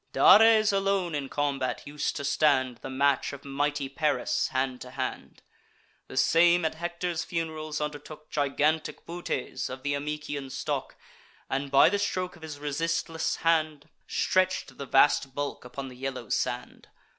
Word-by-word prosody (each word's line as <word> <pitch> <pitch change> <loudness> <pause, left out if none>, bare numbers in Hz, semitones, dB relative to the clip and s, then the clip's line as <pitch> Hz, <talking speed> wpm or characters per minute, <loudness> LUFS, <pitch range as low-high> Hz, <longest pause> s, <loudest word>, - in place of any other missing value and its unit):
Dares 220 -1 +7
alone 195 -3 +1
in 140 -2 -3
combat 140 -4 -1
us'd 150 +1 -3
to - - -4
stand 130 -4 +2
The - - -8
match 140 +1 +1
of 140 0 -10
mighty 145 0 -1
Paris, 145 +2 0
hand 130 -1 -2
to 125 - -8
hand; 130 - -5 0.6
The 130 - -9
same, 170 +4 +4
at 160 - 0
Hector's 170 +1 -3
fun'rals, 155 -2 -3
undertook 150 +1 -6
Gigantic 150 +2 0
Butes, 170 -6 -4
of 130 0 -8
th' 145 0 0
Amycian 145 -1 -4
stock, - - -3 0.6
And, 140 +1 -1
by 140 0 +7
the 205 +2 0
stroke 185 -2 -2
of 170 - -17
his 155 -2 -7
resistless 160 +2 -1
hand, 155 -3 +1 0.2
Stretch'd 185 -8 0
the 140 - -5
vast 135 -1 +3
bulk 145 0 -3
upon 135 +2 -7
the 130 - -10
yellow 130 -3 -5
sand. - - -3
145 Hz, 150 wpm, -28 LUFS, 135-165 Hz, 0.6 s, Dares